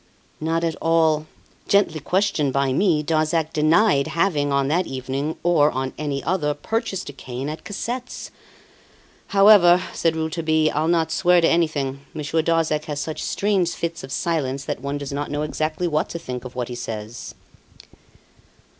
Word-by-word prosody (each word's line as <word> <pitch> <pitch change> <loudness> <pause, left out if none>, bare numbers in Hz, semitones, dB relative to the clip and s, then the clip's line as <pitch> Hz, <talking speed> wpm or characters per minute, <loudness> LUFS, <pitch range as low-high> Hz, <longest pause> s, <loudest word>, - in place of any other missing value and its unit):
"Not 165 +2 -1
at 165 -2 0
all. 160 -2 +2 0.4
Gently 200 -6 +2
questioned 180 -3 +1
by 135 -1 +1
me, 160 -2 +2
Darzac 155 +1 0
denied 155 0 +3
having, 155 -5 0
on 140 -1 +2
that 170 +5 +1
evening, 135 +4 -3
or 160 -4 +4
on 130 -1 -3
any 145 -2 -3
other, 155 -5 0
purchased 195 +1 -3
a - - -8
cane 130 0 -6
at 155 - -7
Cassette's. 245 +5 -5 1.0
However," 195 -3 +7
said 165 -1 +1
Rouletabille, 160 -1 +1
"I'll 155 +2 0
not 165 -1 +1
swear 180 0 +4
to 165 - +3
anything; 145 -5 0 0.2
Monsieur 155 +1 0
Darzac 160 -2 +1
has 145 -2 -4
such 155 +2 -4
strange 195 -4 0
fits 170 0 -4
of 135 - -8
silence 140 -5 -1
that - - -4
one 140 +1 -3
does 140 -1 -6
not 145 +1 -3
know 145 +1 -2
exactly 155 +3 -2
what 155 -2 0
to - - -4
think 125 -6 -6
of 125 - -9
what 125 -1 -3
he - - -5
says." 115 -1 -6
155 Hz, 165 wpm, -22 LUFS, 140-170 Hz, 1.0 s, However